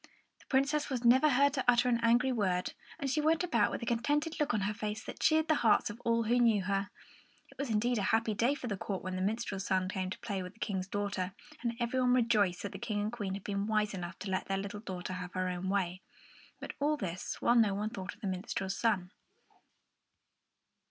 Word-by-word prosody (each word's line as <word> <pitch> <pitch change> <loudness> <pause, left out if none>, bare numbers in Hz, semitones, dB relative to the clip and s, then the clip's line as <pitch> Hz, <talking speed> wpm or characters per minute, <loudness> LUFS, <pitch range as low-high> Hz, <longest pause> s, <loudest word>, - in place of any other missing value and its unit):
The - - -22
Princess 280 +3 +2
was 255 -3 -2
never 260 +6 +6
heard 280 +1 +4
to 265 -3 -1
utter 245 0 +5
an 235 -1 +2
angry 240 +3 +4
word, 185 -6 0 0.2
and 285 -4 -3
she 285 +3 +1
went 320 +3 +2
about 235 -12 +2
with - - -4
a - - -3
contented 290 +7 0
look 300 0 +2
on 210 - 0
her 205 +2 0
face 215 0 -4
that - - -8
cheered 315 0 +3
the 310 - +4
hearts 220 -2 +4
of 215 - -11
all 230 0 +2
who 240 +3 +2
knew 225 -5 +4
her. 195 +1 -1 0.6
It - - -19
was 280 -2 -2
indeed 230 +2 +1
a 195 - 0
happy 225 -1 +2
day 240 +7 +2
for 270 - -7
the 205 -5 -2
court 190 0 -4
when 185 -1 -3
the 185 - -2
minstrel's 200 -1 -2
son 185 -1 +1
came 185 -1 -3
to - - -5
play 200 -3 -3
with 180 +1 -7
the 225 - -25
King's 190 -4 -2
daughter, 200 -2 -2 0.3
and 235 -1 -1
every 245 +2 0
one 250 0 +4
rejoiced 210 -7 +2
that 205 - -4
the 195 - -8
King 215 -2 -2
and 210 +1 -1
the - - -7
Queen 200 -5 -3
had 200 - -7
been 200 0 -2
wise 215 -1 +1
enough 175 -2 -5
to 195 - -5
let 185 - -1
their 195 - 0
little 200 +1 -5
daughter 185 -3 -5
have 180 -1 -6
her 185 0 -1
own 180 +1 -3
way. 185 -2 -1 0.6
But - - -6
all 300 +2 +2
this 180 -6 -4
while 240 - +3
no 220 -5 +4
one 210 +2 -2
thought 190 -5 -6
of 220 - -27
the 205 - -3
minstrel's 190 +1 -3
son. 195 -6 +1
210 Hz, 240 wpm, -32 LUFS, 190-245 Hz, 0.6 s, never